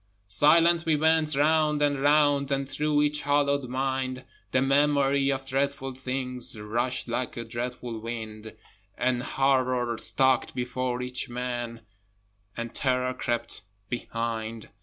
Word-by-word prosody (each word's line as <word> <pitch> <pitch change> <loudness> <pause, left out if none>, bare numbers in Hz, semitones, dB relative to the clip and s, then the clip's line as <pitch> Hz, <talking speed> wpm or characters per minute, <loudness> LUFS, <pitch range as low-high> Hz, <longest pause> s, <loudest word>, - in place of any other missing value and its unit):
Silently 165 - +4
we - - -1
went 160 -1 +3
round 150 +1 +3
and 145 -2 +1
round, 145 -1 +3
And 135 0 0
through 150 +1 +1
each 150 0 +1
hollow 140 0 +2
mind 130 0 -2 0.3
The 130 - +3
memory 140 0 +3
of 135 0 -3
dreadful 135 0 -1
things 125 -3 -5
Rushed 120 +5 -2
like 120 +1 -3
a 120 - -3
dreadful 120 0 -5
wind, 110 -1 -7 0.4
An 125 -1 +1
Horror 130 -3 +1
stalked 130 -1 +2
before 125 0 -2
each 125 +1 -3
man, 120 -1 -4 0.8
And 115 0 -4
terror 125 -1 0
crept 120 -3 -3 0.3
behind. 115 -2 -4
130 Hz, 125 wpm, -27 LUFS, 120-140 Hz, 0.8 s, Silently